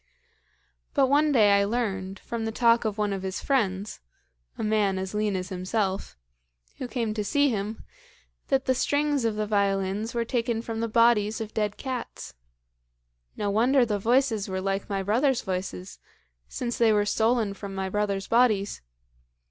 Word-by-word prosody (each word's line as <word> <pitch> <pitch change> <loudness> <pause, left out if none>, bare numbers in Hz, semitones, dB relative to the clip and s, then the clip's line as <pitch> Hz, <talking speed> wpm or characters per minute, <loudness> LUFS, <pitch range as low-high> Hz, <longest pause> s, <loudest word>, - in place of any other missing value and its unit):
But 275 -3 +4
one 295 +2 +4
day 215 -7 +5
I 200 0 +4
learned, 200 -3 -2
from 230 +3 -5
the 225 - -2
talk 235 0 +3
of 215 -1 -1
one 210 -1 0
of 195 - -4
his 190 0 -4
friends 205 -7 -1 0.6
(a - - -3
man 210 -3 +1
as 190 +1 -4
lean 210 -1 0
as 185 0 -3
himself) 190 - -2 0.6
who 255 - -4
came 230 -3 -2
to 215 -1 -2
see 285 +7 +2
him, 215 -1 -3 0.6
that 270 -1 +1
the 260 - +3
strings 285 0 +1
of 225 -2 0
the 215 0 -1
violins 200 +1 0
were 235 -1 0
taken 230 -1 -1
from 225 -1 -4
the 230 - -1
bodies 225 -1 +3
of 220 -1 -6
dead 210 -1 -1
cats. 260 -3 -6 1.0
No 205 -1 -1
wonder 245 +5 +4
the 210 -3 -1
voices 230 -2 +1
were 190 0 -2
like 195 +2 -2
my 195 -1 -1
brothers' 245 +6 +2
voices, 95 - -5 0.5
since 240 -1 -4
they 230 -2 +5
were 205 -1 +2
stolen 220 -1 +1
from 195 0 -8
my 190 0 -2
brothers' 200 0 -1
bodies. 220 -4 +2
215 Hz, 170 wpm, -26 LUFS, 195-235 Hz, 1.0 s, day